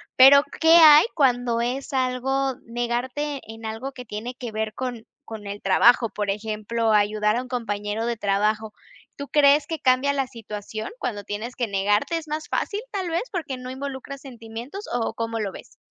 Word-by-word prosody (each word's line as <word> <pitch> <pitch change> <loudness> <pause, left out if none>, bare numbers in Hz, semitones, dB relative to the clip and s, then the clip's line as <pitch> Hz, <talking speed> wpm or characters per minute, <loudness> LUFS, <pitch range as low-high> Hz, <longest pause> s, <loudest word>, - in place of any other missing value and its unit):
pero 280 +2 +8 0.2
¿qué 325 +1 +7
hay 310 -3 +9
cuando 245 -5 +2
es 250 +3 -2
algo, 265 +1 0
negarte 250 +5 -3
en 225 0 -10
algo 225 +5 -5
que 250 -1 -9
tiene 225 +3 -6
que 245 -2 -6
ver 215 0 -3
con 245 -3 -5 0.2
con 215 -2 -8
el 200 +1 -5
trabajo? 230 +4 +4
Por 210 -1 -3
ejemplo, 220 +2 -1
ayudar 210 +1 +2
a - - 0
un 255 - -9
compañero 215 -3 -3
de 235 0 -1
trabajo. 210 +1 0 0.4
¿Tú 280 - -7
crees 285 0 +4
que 325 -1 -4
cambia 260 +2 +3
la 270 -2 -1
situación 215 -3 -7
cuando 205 - -3
tienes 215 +5 -5
que 240 - -1
negarte? 205 +9 +1
Es 320 -1 -7
más 305 +1 -4
fácil, 410 +1 -2
¿tal 380 -4 -3
vez?, 335 +4 0
porque 315 -8 -4
no 250 0 -7
involucras 275 0 -6
sentimientos 240 - -8
o, 235 -2 -1
¿cómo 230 0 -3
lo 205 -3 -2
ves? - - -13
240 Hz, 180 wpm, -24 LUFS, 215-275 Hz, 0.4 s, hay